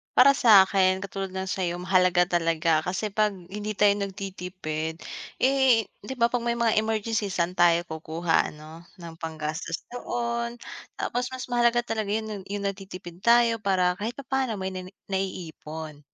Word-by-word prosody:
Para 265 +2 +8
sa'kin 190 -6 +5
katulad 195 0 -4
ng 190 - -2
sayo 185 -2 -2
mahalaga 180 0 +3
talaga, 165 -2 +2
kasi 185 +6 -3
pag 210 0 +1
hindi 205 +4 -6
tayo 205 +1 +4
nagtitipid, 180 -5 -4 0.5
eh, 265 -3 +4
'di 205 - -8
ba, 235 -2 +2
''pag 245 - +1
may 235 0 -1
mga 230 -2 +3
emergencies, 220 -2 -1
saan 170 0 +1
tayo 175 -1 +4
kukuha, 165 0 0
ano, 155 +2 -11 0.2
ng 165 -2 -11
panggastos 160 +1 -4
doon, 235 -1 -3 0.4
tapos 245 0 -2
mas 255 -1 -7
mahalaga 240 0 +3
talaga 220 -3 -2
yun 220 - -1
nun 205 -2 -5
yung 200 +1 -4
nagtitipid 190 -3 -6
tayo 235 +1 +4
para 185 -3 +2
kahit 225 +4 -3
papaano 265 -4 -1
may 190 -1 -3
nanini 185 +1 -8 0.2
naiipon. 160 -5 -5
195 Hz, 155 wpm, -26 LUFS, 175-225 Hz, 0.5 s, Para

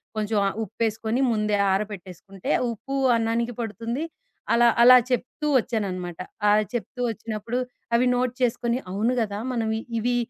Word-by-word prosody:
కొంచెం 215 0 -1
ఆ - - +2
ఉప్పేసుకొని 225 +3 -1
ముందే 210 -1 +1 0.2
ఆరపెట్టేసుకుంటే, 195 -1 -5 0.2
ఉప్పు 230 +5 -6 0.2
అన్నానికి 230 +1 0
పడుతుంది. 230 - -3 0.5
అలా, 240 0 +5
అలా 255 +1 +10
చెప్తూ 255 +4 -2
ఒచ్చాననమాట. 185 -7 -3 0.3
అలా 210 +1 +5
చెప్తూ 245 +2 -5
ఒచ్చినప్పుడు, 225 +2 -4 0.4
అవి 240 +2 +3
నోట్ 250 0 0
చేసుకొని 240 0 +1
అవును. 215 +6 +1
గదా! 205 -2 -2
మనం 225 -2 -1
ఇ - - -6 0.2
ఇవి 245 +2 0
225 Hz, 135 wpm, -25 LUFS, 210-240 Hz, 0.5 s, అలా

